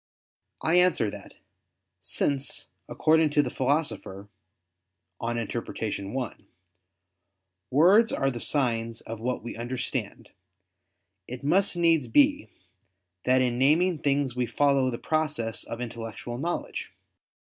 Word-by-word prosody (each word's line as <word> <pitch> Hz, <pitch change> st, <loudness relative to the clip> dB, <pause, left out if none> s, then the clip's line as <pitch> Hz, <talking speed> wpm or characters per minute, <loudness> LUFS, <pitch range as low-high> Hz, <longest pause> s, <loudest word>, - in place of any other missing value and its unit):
I 170 Hz, +3 st, +4 dB
answer 175 Hz, -, +3 dB
that, -, -, -11 dB, 0.7 s
Since, 140 Hz, -1 st, -2 dB, 0.2 s
according 160 Hz, 0 st, +3 dB
to 145 Hz, 0 st, +3 dB
the 125 Hz, -, -4 dB
Philosopher 130 Hz, -8 st, -2 dB, 0.9 s
(Peri 115 Hz, -1 st, -2 dB
Herm. 110 Hz, -2 st, -4 dB
i), 125 Hz, -3 st, -3 dB, 1.3 s
"words 190 Hz, -, +5 dB
are 135 Hz, 0 st, 0 dB
the 120 Hz, -, -6 dB
signs 115 Hz, -4 st, -1 dB
of 115 Hz, 0 st, -7 dB
what 125 Hz, +1 st, -3 dB
we 120 Hz, -, -6 dB
understand," 120 Hz, +2 st, -4 dB, 1.0 s
it 125 Hz, +1 st, -7 dB
must 185 Hz, +5 st, +3 dB
needs 165 Hz, -5 st, +3 dB
be 290 Hz, +1 st, +3 dB, 0.8 s
that 130 Hz, 0 st, +4 dB
in 120 Hz, -1 st, -1 dB
naming 160 Hz, +5 st, +3 dB
things 140 Hz, -3 st, 0 dB
we 125 Hz, -1 st, 0 dB
follow 140 Hz, +1 st, +2 dB
the 120 Hz, -, -3 dB
process 150 Hz, -9 st, -2 dB
of 115 Hz, -, -6 dB
intellectual 120 Hz, 0 st, -6 dB
knowledge. 170 Hz, +4 st, -4 dB
130 Hz, 115 wpm, -27 LUFS, 120-155 Hz, 1.3 s, words